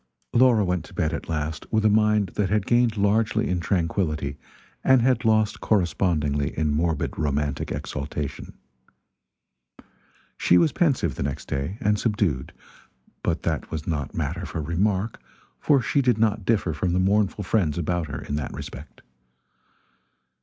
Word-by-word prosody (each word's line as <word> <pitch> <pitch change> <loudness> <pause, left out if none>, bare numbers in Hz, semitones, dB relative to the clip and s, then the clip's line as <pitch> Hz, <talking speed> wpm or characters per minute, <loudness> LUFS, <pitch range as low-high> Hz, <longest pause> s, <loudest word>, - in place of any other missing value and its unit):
Laura 120 -4 +5
went 90 -3 -1
to - - -14
bed 80 -2 0
at 80 - -5
last 80 0 -3
with 110 -1 +2
a - - +6
mind 105 -2 +3
that 95 +2 -1
had 105 -1 +1
gained 120 -2 +2
largely 105 +2 +2
in 90 -1 0
tranquility 80 -4 -1 0.5
and 130 -3 +5
had 130 0 +2
lost 110 -2 +2
correspondingly 80 -7 0
in 75 -1 +1
morbid 80 +1 0
romantic 75 -1 -1
exaltation. 70 0 -5 1.9
She 90 - +4
was 155 - +4
pensive, 135 - +1
the - - -6
next 70 -1 -3
day, 70 +9 -3
and 105 0 +2
subdued; 100 - 0 0.7
but 85 -1 -1
that 80 -3 -2
was 80 -1 -5
not 75 -5 -3
matter - - -3
for - - -5
remark, 95 +7 -1 0.4
for 140 -4 +3
she 140 - +2
did 125 -4 +2
not 110 -2 +1
differ 100 -7 +1
from 85 +3 -1
the 90 - +2
mournful 100 +2 +1
friends 90 -6 +1
about 85 0 -1
her 75 - -6
in - - -6
that 75 - -4
respect. 70 +1 -9
90 Hz, 155 wpm, -24 LUFS, 75-105 Hz, 1.9 s, a